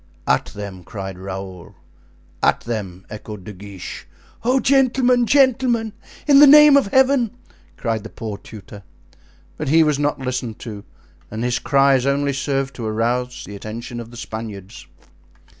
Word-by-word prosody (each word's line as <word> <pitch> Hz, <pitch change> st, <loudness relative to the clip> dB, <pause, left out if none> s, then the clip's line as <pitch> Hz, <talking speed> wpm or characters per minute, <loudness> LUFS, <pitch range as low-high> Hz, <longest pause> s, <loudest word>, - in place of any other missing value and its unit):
"At -, -, +2 dB
them!" 100 Hz, -3 st, -8 dB
cried 95 Hz, -2 st, -7 dB
Raoul. 95 Hz, -2 st, -8 dB, 0.7 s
"At -, -, +2 dB
them!" 100 Hz, -6 st, -5 dB
echoed 105 Hz, -2 st, -8 dB
De 105 Hz, -, -9 dB
Guiche. 100 Hz, -1 st, -9 dB, 0.4 s
"Oh! 255 Hz, +3 st, +2 dB
gentlemen! 255 Hz, -2 st, +3 dB
gentlemen! 250 Hz, -5 st, +2 dB, 0.3 s
in 280 Hz, -2 st, +6 dB
the 295 Hz, -, +9 dB
name 300 Hz, 0 st, +8 dB
of 280 Hz, -6 st, +4 dB
Heaven!" 255 Hz, 0 st, +2 dB, 0.4 s
cried 115 Hz, -3 st, -2 dB
the 110 Hz, -, -9 dB
poor 110 Hz, -3 st, -6 dB
tutor. 100 Hz, -1 st, -12 dB, 0.8 s
But -, -, -3 dB
he 160 Hz, +2 st, +5 dB
was 150 Hz, -2 st, +1 dB
not 145 Hz, 0 st, 0 dB
listened 125 Hz, -4 st, -4 dB
to, 105 Hz, -4 st, -8 dB, 0.5 s
and 110 Hz, +2 st, -5 dB
his 125 Hz, +1 st, 0 dB
cries 135 Hz, -2 st, +3 dB
only 140 Hz, 0 st, +1 dB
served 135 Hz, 0 st, -2 dB
to 115 Hz, -, -5 dB
arouse 120 Hz, +3 st, -1 dB
the 100 Hz, -, -9 dB
attention 115 Hz, +4 st, -7 dB
of 115 Hz, -1 st, -8 dB
the 120 Hz, -, -12 dB
Spaniards. 110 Hz, -4 st, -8 dB
125 Hz, 150 wpm, -20 LUFS, -, 0.8 s, the